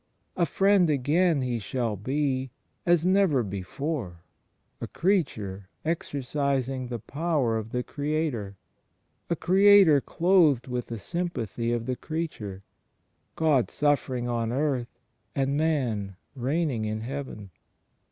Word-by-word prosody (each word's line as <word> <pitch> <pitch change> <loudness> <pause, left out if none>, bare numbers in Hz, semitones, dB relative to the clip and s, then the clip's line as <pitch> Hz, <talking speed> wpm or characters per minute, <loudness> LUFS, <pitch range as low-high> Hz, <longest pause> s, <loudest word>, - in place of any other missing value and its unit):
A 170 -2 +2
Friend 195 -3 +3
again 150 +2 +2
He 120 -2 -1
shall 115 +1 -2
be, 130 +4 -1 0.4
as 170 -1 +4
never 185 -9 +3
before: 100 - -4 0.6
a - - -3
Creature 105 - -1 0.2
exercising 135 -4 -1
the 120 -1 -4
power 140 -1 -1
of 110 0 -3
the 125 +1 -2
Creator: 145 -10 -2 0.7
a 170 - +1
Creator 190 -5 +6
clothed 165 -8 +3
with 125 -2 -3
the 115 - -5
sympathy 120 - -3
of 120 -1 -1
the 130 0 -1
Creature; 120 - -5 0.7
God 150 -6 +2
suffering 130 -4 0
on 115 -1 -1
earth, 130 -2 -1 0.4
and 135 0 +1
Man 125 -11 0 0.2
reigning 135 -2 0
in 110 0 -3
Heaven. 125 -6 -6
135 Hz, 115 wpm, -27 LUFS, 115-160 Hz, 0.7 s, Creator